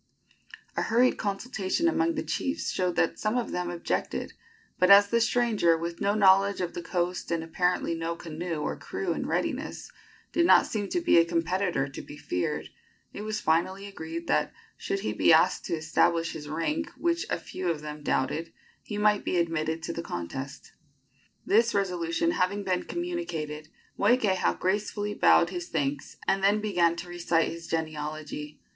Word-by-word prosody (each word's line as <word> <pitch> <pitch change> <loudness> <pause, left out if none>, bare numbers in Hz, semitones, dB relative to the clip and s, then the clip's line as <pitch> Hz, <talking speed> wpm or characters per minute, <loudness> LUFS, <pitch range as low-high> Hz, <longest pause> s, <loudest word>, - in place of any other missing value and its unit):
A - - 0
hurried 245 +3 +3
consultation 210 - -1
among 335 0 +1
the 305 - -2
chiefs 275 +4 -2
showed 180 -2 -1
that 165 - +1
some 215 +3 0
of 245 - -2
them 180 0 -2
objected; 175 -1 -3 0.5
but 185 - +4
as 200 0 +8
the 235 +1 +2
stranger, 225 -8 +3
with 170 +1 -5
no 200 +1 +2
knowledge 195 -1 +5
of 180 -2 -2
the 175 - -5
coast 175 +1 -2
and 165 -1 -1
apparently 180 +1 0
no 165 0 -3
canoe 165 -1 -5
or - - -2
crew - - -3
in - - -4
readiness, - - -3 0.4
did 340 0 +3
not - - +7
seem 205 -2 -3
to 350 - 0
be 335 - +5
a - - +6
competitor 170 -2 0
to 135 - -8
be 145 - -11
feared, 90 -10 -2 0.4
it - - -6
was 215 0 -3
finally 185 +4 0
agreed 165 -4 -6
that, - - +1 0.2
should 390 0 -3
he - - -2
be - - +4
able - - +8 0.2
to - - -1
establish 165 +1 +1
his 150 -2 -8
rank, 300 - -1
which 340 0 0
a - - 0
few 185 -1 -4
of 160 -3 -2
them 150 0 -7
doubted, 150 +4 -1 0.3
he 210 - -6
might 210 0 +3
be 180 - 0
admitted 165 -1 -1
to 170 - -3
the 170 - -4
contest. 135 - -6 0.7
This 225 +2 +3
resolution 180 - 0
having 200 - 0
been 185 -2 -1
communicated, 165 - -4 0.3
Moikeha 205 -3 +2
gracefully 205 +2 -1
bowed 170 -3 +4
his 175 -2 -5
thanks, 145 -2 -2
and 195 0 +1
then 205 +2 +4
began 175 -6 +2
to 170 +1 -7
recite 175 -1 +1
his 165 0 -8
genealogy. 155 -1 -4
180 Hz, 175 wpm, -28 LUFS, 165-210 Hz, 0.7 s, as